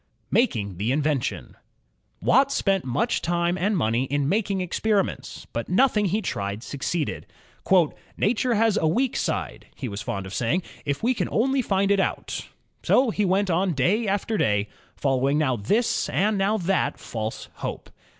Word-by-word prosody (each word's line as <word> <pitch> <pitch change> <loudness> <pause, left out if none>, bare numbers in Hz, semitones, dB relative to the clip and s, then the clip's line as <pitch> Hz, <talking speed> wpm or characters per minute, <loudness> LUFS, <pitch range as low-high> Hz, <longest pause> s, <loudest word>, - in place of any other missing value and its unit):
Making 105 - +1
the 105 +6 0
Invention 145 -2 -1 0.7
Watt 275 +2 +4
spent 195 -7 +1
much 230 - 0
time 175 0 0
and 195 +2 0
money 115 -2 +1
in 140 +1 0
making 200 +2 0
experi 195 +2 +1
ments, - - -8
but 115 - -3
nothing 210 +2 +3
he 205 +4 0
tried 100 - -3
succeeded. 145 +4 -3 0.9
"Nature 240 +3 +1
has 220 0 +3
a 160 - +2
weak 245 +10 +1
side," - - -3
he 130 - -5
was 100 -2 -5
fond 100 -1 -4
of 95 - -8
saying, 125 - 0 0.2
'4f 140 +5 -2
we 250 +3 +3
can - - -2
only 265 +4 +2
find 195 -3 +1
it 200 - +3
out." - - -2 0.3
So 255 -3 +3
he 210 -1 0
went 190 +1 +2
on 180 +2 +1
day 200 - +2
after 205 +2 0
day, 105 -1 +1 0.3
following 135 +1 +1
now 140 -5 +2
this 205 - 0
and 210 +3 +1
now 200 +2 +1
that 190 0 0
false 110 -1 -5
hope. - - -6
185 Hz, 165 wpm, -25 LUFS, 130-210 Hz, 0.9 s, Watt